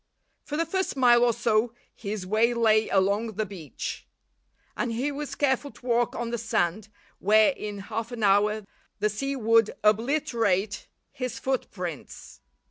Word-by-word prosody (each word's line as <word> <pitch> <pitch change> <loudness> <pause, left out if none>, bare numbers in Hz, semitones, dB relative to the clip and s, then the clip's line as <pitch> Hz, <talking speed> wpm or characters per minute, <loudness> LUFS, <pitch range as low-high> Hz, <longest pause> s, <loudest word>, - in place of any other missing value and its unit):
For 295 - -4
the 330 - +1
first 380 +1 -2
mile 240 -2 +5
or 240 - +4
so 230 0 +1 0.2
his 205 -2 -5
way 220 +5 +2
lay 220 -2 +3
along 200 +4 +1
the 215 +2 -2
beach, 185 -7 -7 0.7
and 240 - -2
he 255 +6 -1
was 290 0 -5
careful 285 0 +1
to 255 - -18
walk 240 -1 +1
on 235 0 -3
the 235 - -2
sand, 215 -1 -1 0.3
where, 215 +5 +5
in 210 -6 -6
half 220 +4 -5
an 235 -3 -5
hour, 210 +1 +3 0.3
the 210 0 0
sea 275 +6 -3
would 230 -3 +3
obliterate 220 -3 +1 0.2
his 255 -2 -4
footprints. 185 - -5
225 Hz, 150 wpm, -26 LUFS, 210-245 Hz, 0.7 s, mile